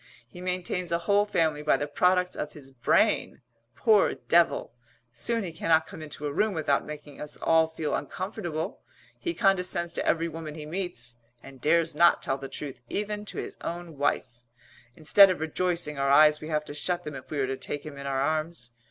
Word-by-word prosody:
He 175 Hz, +9 st, -12 dB
maintains 180 Hz, -1 st, -2 dB
a 170 Hz, -, +3 dB
whole 205 Hz, 0 st, +4 dB
family 160 Hz, -7 st, +1 dB
by 150 Hz, -, +3 dB
the 145 Hz, -, -2 dB
products 180 Hz, +5 st, +2 dB
of 150 Hz, -, -4 dB
his 135 Hz, -3 st, -10 dB
brain 125 Hz, -3 st, +1 dB, 0.3 s
poor 215 Hz, -3 st, +4 dB
devil! 170 Hz, -7 st, +2 dB, 0.4 s
Soon 230 Hz, -, -1 dB
he 175 Hz, -, -5 dB
cannot 160 Hz, -1 st, +2 dB
come -, -, -10 dB
into 150 Hz, -1 st, -6 dB
a 145 Hz, -, -2 dB
room 210 Hz, +3 st, +1 dB
without 145 Hz, -3 st, +1 dB
making 150 Hz, -1 st, -9 dB
us 150 Hz, -, -4 dB
all 160 Hz, 0 st, +3 dB
feel 160 Hz, -1 st, -3 dB
uncomfortable; 175 Hz, 0 st, -4 dB, 0.4 s
he 345 Hz, -1 st, -3 dB
condescends 180 Hz, -4 st, +1 dB
to -, -, -2 dB
every 165 Hz, 0 st, +1 dB
woman 160 Hz, -2 st, -7 dB
he 155 Hz, -1 st, -7 dB
meets, 150 Hz, -8 st, -4 dB, 0.3 s
and 135 Hz, -2 st, -13 dB
dares 165 Hz, +2 st, +3 dB
not 170 Hz, +3 st, +4 dB
tell 135 Hz, 0 st, -1 dB
the 135 Hz, 0 st, -7 dB
truth 135 Hz, -5 st, -7 dB
even 210 Hz, 0 st, -3 dB
to -, -, -7 dB
his -, -, -5 dB
own 170 Hz, -1 st, -5 dB
wife; 125 Hz, -3 st, -2 dB, 0.5 s
instead 195 Hz, +5 st, +7 dB
of 185 Hz, -, -1 dB
rejoicing 160 Hz, -2 st, -1 dB
our 140 Hz, 0 st, +1 dB
eyes 150 Hz, +2 st, +6 dB
we 155 Hz, -, -6 dB
have 150 Hz, -1 st, -1 dB
to 145 Hz, -, -8 dB
shut 175 Hz, +4 st, -1 dB
them 150 Hz, -, -6 dB
if 135 Hz, -1 st, -9 dB
we 150 Hz, -, -4 dB
are 135 Hz, -, +2 dB
to 135 Hz, +1 st, -2 dB
take 145 Hz, +2 st, -5 dB
him 150 Hz, -2 st, -7 dB
in 140 Hz, -, -6 dB
our 135 Hz, -1 st, 0 dB
arms. 155 Hz, -3 st, -1 dB
160 Hz, 200 wpm, -27 LUFS, 145-180 Hz, 0.5 s, instead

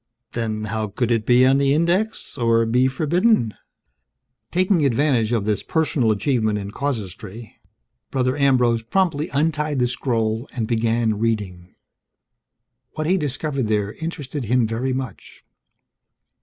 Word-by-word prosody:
Then, 110 Hz, -2 st, -3 dB
how 110 Hz, 0 st, -2 dB
could 120 Hz, +4 st, -2 dB
it 115 Hz, -2 st, 0 dB
be 125 Hz, +1 st, +6 dB
on 135 Hz, +1 st, +4 dB
the 140 Hz, 0 st, +3 dB
Index 180 Hz, +7 st, 0 dB
or 115 Hz, -1 st, +2 dB
be 125 Hz, +3 st, +3 dB
forbidden? 155 Hz, -, +2 dB, 1.0 s
Taking 185 Hz, -2 st, +2 dB
advantage 130 Hz, -4 st, +2 dB
of 115 Hz, -4 st, 0 dB
this 105 Hz, -1 st, 0 dB
personal 150 Hz, -7 st, 0 dB
achievement 110 Hz, -1 st, +1 dB
in 100 Hz, 0 st, -5 dB
casuistry, 110 Hz, -4 st, -5 dB, 0.5 s
Brother 130 Hz, -1 st, 0 dB
Ambrose 125 Hz, -5 st, +3 dB
promptly 155 Hz, +4 st, 0 dB
untied 150 Hz, 0 st, 0 dB
the 125 Hz, -, +2 dB
scroll 115 Hz, -1 st, -1 dB
and 115 Hz, -3 st, -1 dB
began 115 Hz, -1 st, +1 dB
reading. 100 Hz, -6 st, -3 dB, 1.2 s
What 155 Hz, -, -2 dB
he 180 Hz, +4 st, +3 dB
discovered 145 Hz, -, -2 dB
there 105 Hz, -1 st, 0 dB
interested 150 Hz, -5 st, -5 dB
him 120 Hz, +2 st, +2 dB
very 115 Hz, +4 st, -2 dB
much. 130 Hz, -6 st, -6 dB
125 Hz, 130 wpm, -22 LUFS, 110-145 Hz, 1.2 s, be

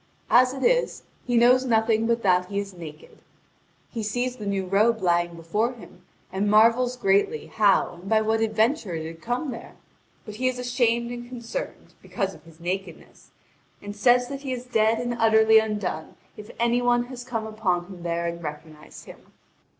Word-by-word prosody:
As 255 Hz, +1 st, +6 dB
it 265 Hz, 0 st, -6 dB
is, -, -, +1 dB, 0.2 s
he 245 Hz, -1 st, +2 dB
knows 250 Hz, +2 st, +5 dB
nothing 225 Hz, -2 st, +2 dB
but 235 Hz, 0 st, 0 dB
that 180 Hz, -2 st, +3 dB
he 200 Hz, -, -5 dB
is 200 Hz, -1 st, -3 dB
naked. 160 Hz, -3 st, -12 dB, 0.7 s
He 230 Hz, -, -4 dB
sees 245 Hz, +4 st, -2 dB
the 210 Hz, -3 st, -6 dB
new 195 Hz, -1 st, -1 dB
robe 215 Hz, +5 st, +2 dB
lying 175 Hz, -1 st, +1 dB
before 210 Hz, +9 st, -1 dB
him, 240 Hz, -, -15 dB, 0.3 s
and 200 Hz, +2 st, 0 dB
marvels 230 Hz, +4 st, +4 dB
greatly 205 Hz, -, +1 dB
how 200 Hz, -4 st, +2 dB
and 195 Hz, -, -9 dB
by 220 Hz, -1 st, +3 dB
what 220 Hz, +1 st, 0 dB
adventure 220 Hz, -, 0 dB
it 160 Hz, -1 st, -4 dB
had 165 Hz, 0 st, -9 dB
come 250 Hz, +4 st, -2 dB
there. 230 Hz, -, -10 dB, 0.5 s
But 210 Hz, -1 st, -9 dB
he 255 Hz, +2 st, 0 dB
is 255 Hz, -1 st, -1 dB
ashamed 240 Hz, -1 st, 0 dB
and 240 Hz, 0 st, -7 dB
concerned, 250 Hz, -, -7 dB
because 195 Hz, -3 st, -3 dB
of -, -, -17 dB
his 165 Hz, 0 st, -17 dB
nakedness, 180 Hz, 0 st, -6 dB, 0.5 s
and 205 Hz, 0 st, -8 dB
says 245 Hz, +4 st, +3 dB
that 275 Hz, 0 st, -6 dB
he 270 Hz, -2 st, -5 dB
is 250 Hz, 0 st, -6 dB
dead 225 Hz, -2 st, +2 dB
and 240 Hz, 0 st, -2 dB
utterly 220 Hz, 0 st, +6 dB
undone 210 Hz, -7 st, -3 dB, 0.2 s
if 210 Hz, 0 st, -11 dB
any 235 Hz, +1 st, +2 dB
one 240 Hz, 0 st, +2 dB
has 245 Hz, 0 st, -9 dB
come 230 Hz, -3 st, -4 dB
upon 205 Hz, -5 st, -1 dB
him 180 Hz, -1 st, -11 dB
there 170 Hz, 0 st, -2 dB
and 170 Hz, 0 st, -4 dB
recognised 150 Hz, 0 st, -9 dB
him. -, -, -15 dB
220 Hz, 185 wpm, -25 LUFS, 190-245 Hz, 0.7 s, As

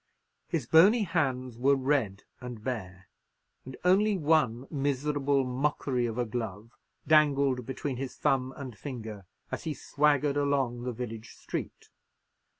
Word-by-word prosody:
His 160 Hz, -8 st, -2 dB
bony 195 Hz, -, +6 dB
hands 130 Hz, -, -1 dB
were 140 Hz, +3 st, +4 dB
red 130 Hz, -8 st, 0 dB, 0.2 s
and 125 Hz, -4 st, -8 dB
bare, 95 Hz, -7 st, -5 dB, 0.6 s
and 130 Hz, 0 st, -9 dB
only 200 Hz, +3 st, +4 dB
one 145 Hz, -7 st, +2 dB
miserable 140 Hz, -1 st, 0 dB
mockery 125 Hz, -1 st, 0 dB
of 115 Hz, 0 st, -5 dB
a 125 Hz, -, +1 dB
glove 110 Hz, -1 st, -5 dB, 0.3 s
dangled 140 Hz, -5 st, +3 dB
between 135 Hz, 0 st, -3 dB
his 130 Hz, 0 st, -5 dB
thumb 130 Hz, -1 st, +1 dB
and 130 Hz, -5 st, -7 dB
finger 110 Hz, -7 st, -7 dB, 0.2 s
as -, -, -4 dB
he 155 Hz, -2 st, -2 dB
swaggered 145 Hz, -1 st, +1 dB
along 135 Hz, -4 st, 0 dB
the 125 Hz, -, -1 dB
village 115 Hz, -2 st, -7 dB
street. -, -, -6 dB
130 Hz, 135 wpm, -29 LUFS, 120-145 Hz, 0.6 s, bony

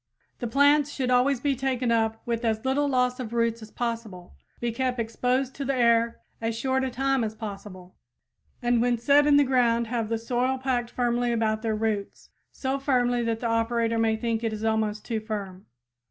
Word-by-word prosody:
The 240 Hz, -, -3 dB
plants 285 Hz, +3 st, +4 dB
should 260 Hz, -3 st, -2 dB
always 250 Hz, +1 st, +3 dB
be 280 Hz, +1 st, 0 dB
taken 255 Hz, -2 st, -1 dB
up 225 Hz, -1 st, 0 dB
with 235 Hz, 0 st, -2 dB
as 220 Hz, 0 st, -1 dB
little 280 Hz, +2 st, +1 dB
loss 250 Hz, -1 st, +1 dB
of 235 Hz, -3 st, -5 dB
roots 230 Hz, -1 st, 0 dB
as 220 Hz, -, -10 dB
possible, 225 Hz, -7 st, -5 dB, 0.3 s
be 240 Hz, 0 st, -1 dB
kept 255 Hz, +1 st, -1 dB
exposed 250 Hz, +3 st, -1 dB
to 275 Hz, -, -5 dB
the 275 Hz, 0 st, -1 dB
air 235 Hz, -1 st, +2 dB, 0.2 s
as 225 Hz, 0 st, -2 dB
short 265 Hz, +2 st, 0 dB
a 265 Hz, -, -1 dB
time 270 Hz, 0 st, 0 dB
as 220 Hz, -1 st, -3 dB
possible, 200 Hz, -4 st, -9 dB, 0.7 s
and 240 Hz, -1 st, +2 dB
when 245 Hz, 0 st, +2 dB
set 285 Hz, +5 st, +4 dB
in 290 Hz, -1 st, +6 dB
the 290 Hz, -, +6 dB
ground 240 Hz, -3 st, +2 dB
have 230 Hz, -2 st, -2 dB
the 230 Hz, -, 0 dB
soil 250 Hz, +3 st, -1 dB
packed 255 Hz, -2 st, -1 dB
firmly 240 Hz, 0 st, 0 dB
about 220 Hz, -2 st, 0 dB
their 220 Hz, -1 st, -1 dB
roots, 215 Hz, -2 st, -3 dB, 0.2 s
so 270 Hz, 0 st, -2 dB
firmly 245 Hz, -3 st, +1 dB
that 230 Hz, -1 st, -2 dB
the 240 Hz, -, -1 dB
operator 230 Hz, 0 st, +1 dB
may 225 Hz, -1 st, +2 dB
think 230 Hz, 0 st, -2 dB
it 225 Hz, -1 st, -1 dB
is 215 Hz, 0 st, -5 dB
almost 220 Hz, -1 st, 0 dB
too 225 Hz, -2 st, -2 dB
firm. 200 Hz, -3 st, -6 dB
235 Hz, 195 wpm, -26 LUFS, 225-255 Hz, 0.7 s, in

